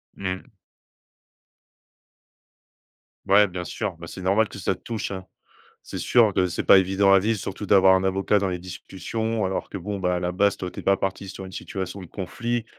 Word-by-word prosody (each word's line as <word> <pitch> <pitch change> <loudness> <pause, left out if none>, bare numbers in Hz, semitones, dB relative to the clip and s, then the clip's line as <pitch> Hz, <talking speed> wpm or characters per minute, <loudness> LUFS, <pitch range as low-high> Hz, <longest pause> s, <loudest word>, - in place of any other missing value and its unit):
Mmh. 95 -1 -4 2.8
Ouais 100 +2 +6
bien 90 -1 -5
sûr, 100 -3 -4
bah, 85 +1 -9
c'est 95 - -8
normal 100 +4 +3
que 100 - -11
ça 95 - 0
te - - -22
touche, 115 -4 -4
hein. 95 -2 -6 0.6
C'est - - -7
sûr 115 -4 +4
que 95 -1 +3
c'est 90 - -3
pas - - +8
évident 95 +1 +4
à 95 - +7
vivre. 110 +2 0
Surtout 100 +2 -5
d'avoir 95 -1 +6
un 95 - +1
avocat 95 +2 +2
dans 100 -1 0
les 90 -1 -3
discussions 95 +5 -4
alors 95 0 -3
que - - -5
bon, 100 +3 -4
bah, 90 -1 0
à - - -1
la 90 0 -2
base, 100 +2 +2
toi 90 - -4
tu - - -8
es - - -18
pas 100 0 +3
parti 95 0 -3
sur 95 - -8
une 95 - -11
situation 95 0 -5
de 90 - -8
conflit, 120 +5 -3
95 Hz, 205 wpm, -24 LUFS, 95-100 Hz, 2.8 s, pas